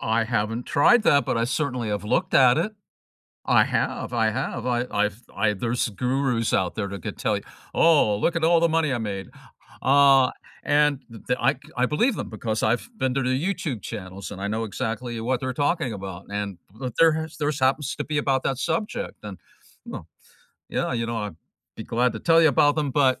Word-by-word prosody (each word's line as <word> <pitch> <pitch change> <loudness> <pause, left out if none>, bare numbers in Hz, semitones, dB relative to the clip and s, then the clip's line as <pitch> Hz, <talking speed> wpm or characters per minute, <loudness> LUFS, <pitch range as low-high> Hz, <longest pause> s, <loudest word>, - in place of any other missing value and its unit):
I 115 +1 +1
haven't 115 +1 -1
tried 230 +11 +4
that, 140 - +4
but - - -1
I 115 - +1
certainly 125 -3 -2
have 105 0 -2
looked 185 - 0
at 125 -2 +6
it. 215 - -1 0.7
I - - +5
have, - - -2
I 110 -2 +2
have, 110 - -3
I 120 -1 0
I've 105 +2 -1
I 105 +1 +2
there's 120 +5 -1
gurus 125 +1 0
out 90 -2 +1
there 105 -2 -2
that 100 -2 -8
could - - -5
tell - - 0
you, - - -9 0.3
"Oh, 150 -11 +4
look 170 +11 0
at 165 - -1
all 165 +1 +5
the 170 0 +3
money 160 -2 +1
I - - 0
made," 100 -4 -4 0.6
uh, 135 -1 +5 0.3
and 145 -1 +3 0.3
th 125 - +1
I 135 +4 +3
c 130 - -18 0.2
I 125 - +3
believe 215 - +1
them, - - -5
because 110 0 -3
I've 115 - 0
been 130 -8 0
to 135 - +1
their 130 +1 +1
YouTube 160 - -2
channels, 95 -3 -7
and 95 -1 -7
I 100 - -2
know 110 +2 -2
exactly 115 +1 -4
what 125 +2 -1
they're 130 0 -2
talking 145 -2 0
about, 95 -2 -7
and 100 -2 -3 0.4
there 165 -1 +7
has 160 0 -5
theirs 150 -1 -1
happens 135 +2 +1
to - - -2
be 150 0 -2
about 135 -3 +1
that 135 - -1
subject, 210 - -3
and, 100 -3 -7 0.5
well, - - -8 0.6
yeah, - - -1
you 115 -1 -1
know, 115 0 -3
I'd 105 -6 -5 0.4
be - - -7
glad 125 +2 +1
to - - -6
tell 165 0 +5
you 160 - +6
about 145 0 +4
them, 150 -3 0
but, 130 -2 +2
125 Hz, 210 wpm, -24 LUFS, 110-145 Hz, 0.7 s, there